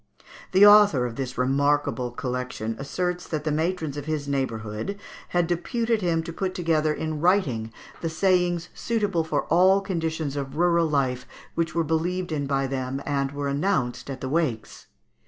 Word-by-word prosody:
The 190 +2 +7
author 205 -11 +7
of 120 -2 -4
this 130 -1 -4
remarkable 135 -1 +1
collection 125 -2 -4
asserts 180 +5 -3
that 155 -2 -3
the 155 - -1
matrons 160 -1 -1
in 145 - -5
his 150 -2 -2
neighbourhood 125 - -3 0.3
had 175 -1 +1
deputed 225 +7 -1
him 165 -3 +1
to 170 - -7
put 185 +1 -3
together 160 -3 +1
in 155 0 -3
writing 145 - +2 0.3
the 165 - -1
sayings 180 0 +1
suitable 205 -7 0
for 160 - -1
all 185 +3 +4
conditions 160 -6 -2
of 140 0 -4
rural 170 -1 +3
life 130 -4 0 0.3
which 165 0 -1
were 165 - +2
believed 170 +3 -1
in 145 -3 -1
by 135 -1 +1
them 130 0 -3
and 140 -1 -1
were 140 0 -3
announced 140 -4 -1
at 135 - -6
the 130 - -3
wakes. 140 -8 -2
155 Hz, 165 wpm, -25 LUFS, 135-175 Hz, 0.3 s, The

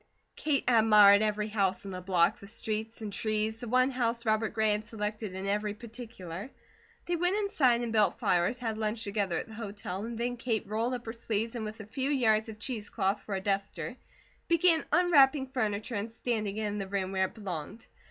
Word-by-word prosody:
Kate 295 -3 0
admired 210 -4 +7
every 210 0 0
house 195 -3 0
in 195 - -5
the 185 -1 -5
block, 180 -2 +2
the 200 - -11
streets 220 +2 -3
and 205 -2 -5
trees, 215 +1 -1
the 245 - -6
one 255 +3 +3
house 235 -2 -1
Robert 220 0 +2
Gray 220 -1 +3
had 210 +1 0
selected 210 -2 -4
in 190 +1 -4
every 205 +1 -1
particular. 220 -4 -8 0.6
They 350 - 0
went 355 +4 +2
inside 275 - +3
and 235 -2 -3
built 210 -4 +3
fires, 180 +7 +1
had 225 -3 -3
lunch 220 +1 -1
together 200 -4 -1
at - - -4
the 220 - -11
hotel, 205 -3 -5
and 230 0 -5
then 245 +1 -2
Kate 230 -2 -1
rolled 225 +5 -1
up 240 - -8
her 225 - -5
sleeves 230 0 -2
and 230 -3 -4
with 215 +1 -7
a - - -9
few 265 +6 -2
yards 225 -6 +2
of 215 - -8
cheese 220 -3 -5
cloth 200 0 0
for 200 - -4
a 190 - -2
duster, 195 -2 -2 0.5
began 335 -1 +4
unwrapping 295 -5 +5
furniture 220 -4 -2
and 210 +1 -3
standing 215 -3 -2
it 220 - -1
in 205 0 -2
the 195 - -4
room 190 -1 -2
where 190 -1 +2
it 190 - -8
belonged. 195 0 -6
220 Hz, 210 wpm, -30 LUFS, 205-240 Hz, 0.6 s, admired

